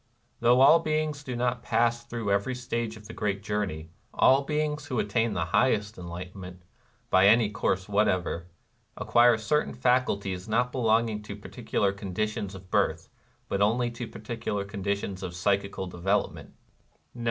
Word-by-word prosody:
Though 120 +2 +4
all 150 +5 +8
beings 155 -2 -1
do 125 -3 -5
not 120 0 -1
pass 120 0 +1
through 115 -3 -3
every 100 +6 0
stage 120 -3 -3
of 105 - -15
the 115 - -9
great 100 -2 -2
journey, 95 -7 -3 0.2
all 135 +1 +5
beings 150 +1 -2
who 125 - -3
attain 115 +2 +1
to - - -4
the 85 -2 0
highest 110 -4 +2
enlightenment, 90 +1 -8 0.5
by 95 +1 +6
any 110 0 +5
course 95 -2 -1
whatever, 95 -4 0 0.5
acquire 120 -1 +4
certain 150 +8 0
faculties 100 -7 0
not 120 +3 +1
belonging 115 -3 +1
to 105 -1 -8
particular 105 -1 -2
conditions 100 0 -3
of 95 0 -13
birth, - - 0 0.4
but 100 - -1
only 120 +4 +2
to 120 0 -6
particular 110 -3 -4
conditions 100 -1 -3
of 90 -2 -5
psychical 100 +1 0
development. 95 +3 -2
105 Hz, 150 wpm, -27 LUFS, 100-120 Hz, 0.5 s, all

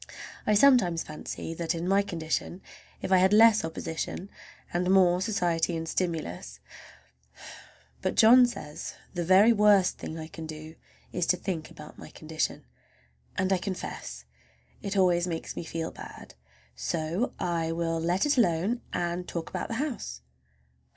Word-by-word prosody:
I 210 - +4
sometimes 205 -9 +5
fancy 155 +1 -6
that 165 0 -2
in 170 +1 -3
my 195 +1 +4
condition 170 -1 -3 0.4
if - - -3
I 190 - +7
had 190 +1 +4
less 220 0 +6
opposition 160 +4 -5 0.4
and 180 +1 0
more 180 -2 +4
society 175 -5 0
and 165 0 -5
stimulus—but 160 - -3 1.6
John 245 +3 +7
says 150 -11 -7 0.2
the 175 -1 -2
very 190 +6 +6
worst 205 -3 +4
thing 160 - -6
I 160 - -6
can 160 0 -8
do 155 0 -8 0.4
is 175 -1 -1
to 180 - +3
think 175 -5 -4
about 150 0 -12
my - - -10
condition, 155 0 -4 0.7
and 190 +1 +2
I 185 - +1
confess 175 - -6 0.6
it 200 0 -3
always 175 -2 +3
makes 165 -2 -4
me - - -4
feel 165 0 -4
bad. - - -11 0.4
So 155 - -2
I 165 -2 -1
will 165 0 -1
let 175 - +1
it 290 -3 +2
alone 195 +4 +1
and 175 +1 -2
talk 170 -1 -5
about - - -3
the 230 - -4
house. 230 - -4
175 Hz, 150 wpm, -28 LUFS, 160-195 Hz, 1.6 s, I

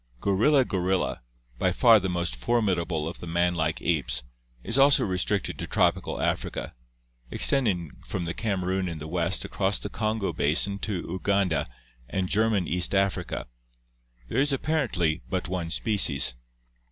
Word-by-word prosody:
Gorilla 125 - +3
gorilla, 95 -2 -1 0.4
by 95 - +2
far 115 +3 +6
the 95 -1 -2
most 85 -6 -1
formidable 85 - 0
of 85 - -6
the 85 - -8
man 85 +1 +1
like 80 -2 -1
apes, 70 -8 0 0.4
is 115 - -3
also 140 +1 +5
restricted 95 +1 -1
to - - -4
tropical - - +1
Africa, - - -2 0.6
extending 100 - +1 0.2
from 85 - -3
the 85 - -3
Kamerun 95 -3 -1
in 85 - -5
the 75 0 -7
West 85 +2 -1
across 100 +1 0
the 100 - -5
Kongo 110 -2 -1
basin 90 +7 +1
to 105 - -3
Uganda 95 -2 0 0.4
and 95 -2 -2
German 105 -3 +2
East 90 +2 0
Africa. 95 0 0 0.8
There 120 - +1
is 145 +1 +2
apparently 125 - 0
but 95 -1 -2
one 90 -2 -3
species. 80 - +3
95 Hz, 145 wpm, -26 LUFS, 85-105 Hz, 0.8 s, far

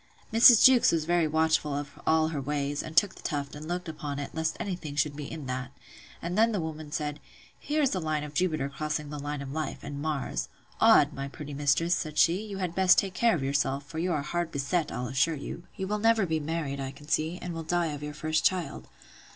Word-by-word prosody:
Mrs. 230 0 +8
Jewkes 260 -2 +7
was 160 -2 0
very 170 -1 +2
watchful 160 -1 +1
of 145 0 -6
all 160 0 +3
her 150 -3 -3
ways, 145 +1 -2
and 155 +1 -9
took 205 -3 +5
the - - -14
tuft, 145 -2 -3
and 150 +1 -8
looked 175 +1 -3
upon 150 -3 -5
it, 145 - -5
lest 160 0 -1
any 195 -3 -2
thing 155 -5 -8
should 145 -1 0
be 145 -1 -7
in 155 -3 -6
that. 130 0 -4 0.5
And 170 +2 -3
then 225 +2 +4
the 205 - 0
woman 155 -2 -6
said, 150 -1 -3 0.4
Here 300 +1 0
is 275 - +2
the 185 - -1
line 155 -2 -1
of 150 -1 -8
Jupiter 155 -4 0
crossing 150 +1 -4
the 150 - -5
line 145 0 -4
of 135 - -7
life; 155 -1 -4
and 145 0 -6
Mars—Odd! 150 -3 +1
my 140 0 -4
pretty 145 +1 -8
mistress, 145 +5 +2
said 155 -3 -3
she, 175 +4 +4
you 205 -3 -6
had 180 -3 -2
best 185 0 +5
take 195 -2 +1
care 230 +3 +3
of 145 - -3
yourself; 140 0 0
for 160 +3 -6
you 180 +2 0
are 150 -4 0
hard 170 +2 -2
beset, 150 +4 -1
I'll 125 - -3
assure 135 +6 +1
you. 160 +4 -7
You 190 - -3
will 210 +2 -1
never 225 -1 +3
be 160 -2 0
married, 150 -2 -3
I 135 -1 -3
can 145 +2 -13
see; 160 +3 0
and 180 -1 -5
will 165 - -4
die 165 -1 0
of 145 - -7
your 150 0 -6
first 155 0 0
child. 185 -3 0
155 Hz, 240 wpm, -28 LUFS, 145-175 Hz, 0.5 s, Mrs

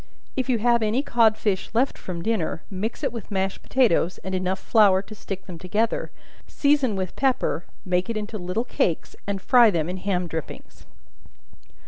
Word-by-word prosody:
If 260 -1 -2
you 245 - +3
have 235 +1 +3
any 220 +5 +1
cod 225 -5 +3
fish 200 -3 -1
left 255 +4 +2
from 170 -2 -6
dinner, 210 -8 -1
mix 205 +4 -4
it - - 0
with 230 -5 -7
mashed 195 -1 -2
potatoes, 210 -9 +2
and 190 - -4
enough 185 0 0
flour 200 -4 +4
to 215 - -11
stick 195 -2 -7
them 175 -3 -9
together; 210 +6 -1 0.4
season 280 -6 +2
with 185 -2 -3
pepper; 255 -9 0 0.2
make 180 +2 0
it 230 - -1
into 215 0 -4
little 180 +7 -2
cakes, 170 -8 -1
and 200 -1 -1
fry 240 +3 +6
them 165 -5 0
in 180 +1 -3
ham 180 -1 -1
drippings. 160 -3 -7
205 Hz, 175 wpm, -24 LUFS, 185-230 Hz, 0.4 s, fry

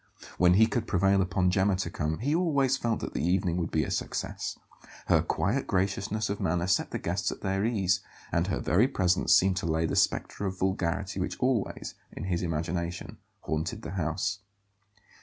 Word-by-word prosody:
When 90 0 +6
he 110 +3 +7
could 115 0 -2
prevail 95 +1 +3
upon 90 -1 +1
Gemma 95 +1 +2
to 95 - -3
come 75 +1 -2
he 140 +6 -1
always 140 -6 +2
felt 115 -3 -1
that - - -5
the - - -2
evening 90 0 +1
would 85 - -1
be 80 - +1
a - - -4
success. - - -3 0.5
Her - - +4
quiet 100 +12 -1
graciousness 100 +3 0
of 100 +1 -3
manner 85 +1 +1
set 90 0 +1
the - - -3
guests 90 +2 -1
at - - -8
their 95 0 0
ease, 95 -5 +2 0.3
and - - +1
her - - -1
very 95 - +3
presence 95 -8 +1
seemed 95 0 +3
to 95 - -2
lay 80 0 +1
the - - -1
spectre 100 - +1
of 95 0 -4
vulgarity 95 +1 -1
which 90 - -3
always, 125 -5 -1 0.2
in - - -6
his 90 -2 -1
imagination, 85 +1 -3 0.2
haunted 80 +9 -3
the - - -5
house. 90 +2 -1
95 Hz, 190 wpm, -28 LUFS, 85-100 Hz, 0.5 s, he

